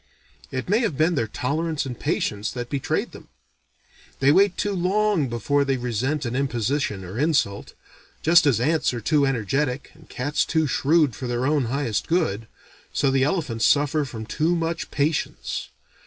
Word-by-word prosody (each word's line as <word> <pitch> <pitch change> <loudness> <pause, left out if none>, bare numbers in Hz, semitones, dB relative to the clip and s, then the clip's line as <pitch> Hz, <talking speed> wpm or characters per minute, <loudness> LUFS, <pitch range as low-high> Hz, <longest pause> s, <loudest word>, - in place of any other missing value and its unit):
It 130 -1 -4
may 205 +5 +3
have 220 - -1
been 160 +3 +3
their 115 -8 0
tolerance 150 +7 -2
and 125 -3 -6
patience 105 +1 -1
that 120 -1 -6
betrayed 140 -2 -1
them. - - -13 0.9
They 135 +1 +5
wait 195 +3 +4
too 205 - -1
long 190 -4 +1
before 140 +5 +1
they 135 -1 0
resent 125 +4 -2
an 120 +1 -3
imposition 130 -5 -1
or 95 +7 -6
insult. 140 -10 0 0.5
Just 170 0 +5
as 125 -6 +3
ants 150 0 +1
are - - -3
too 140 +5 +2
energetic 135 +3 -1
and 155 +1 -20
cats 145 +4 -1
too 160 -1 +1
shrewd 145 - +2
for 125 - -5
their 120 +1 -1
own 145 -2 +2
highest 120 -3 -1
good, 135 - 0 0.4
so 135 - +1
the 135 0 +2
elephants 135 - 0
suffer 145 +1 +2
from 115 -5 -7
too 160 +9 0
much 165 0 -2
patience. 140 - -2
140 Hz, 170 wpm, -24 LUFS, 120-160 Hz, 0.9 s, They